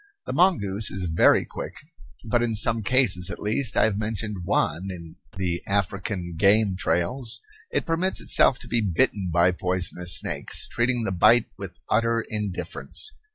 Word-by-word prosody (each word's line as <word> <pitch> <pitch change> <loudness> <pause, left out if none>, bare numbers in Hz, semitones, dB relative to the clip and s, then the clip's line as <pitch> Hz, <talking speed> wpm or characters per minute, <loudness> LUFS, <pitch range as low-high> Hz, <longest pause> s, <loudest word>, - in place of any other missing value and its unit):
The - - -4
mongoose 110 - +2
is 90 -3 -4
very 80 - +4
quick, - - -8 0.5
but 120 +2 +1
in 115 -2 -1
some 110 +2 +2
cases 100 -5 +3
at - - -6
least 110 +3 0
I - - +4
have 105 -2 0
mentioned 105 -1 -4
one 95 +3 -1
in 85 -3 -9 0.2
the 90 -2 -2
"African 100 -2 -2
Game 100 0 +4
Trails" 100 +7 -1 0.3
it - - -2
permits 170 +3 0
itself 125 - +3
to - - -10
be 120 -1 0
bitten 100 0 0
by 85 +2 +3
poisonous 90 -1 +2
snakes, - - -1
treating 120 0 0
the 95 - -2
bite 110 +6 +4
with - - -9
utter 115 +1 +1
indifference. 105 - -4
105 Hz, 155 wpm, -24 LUFS, 90-115 Hz, 0.5 s, very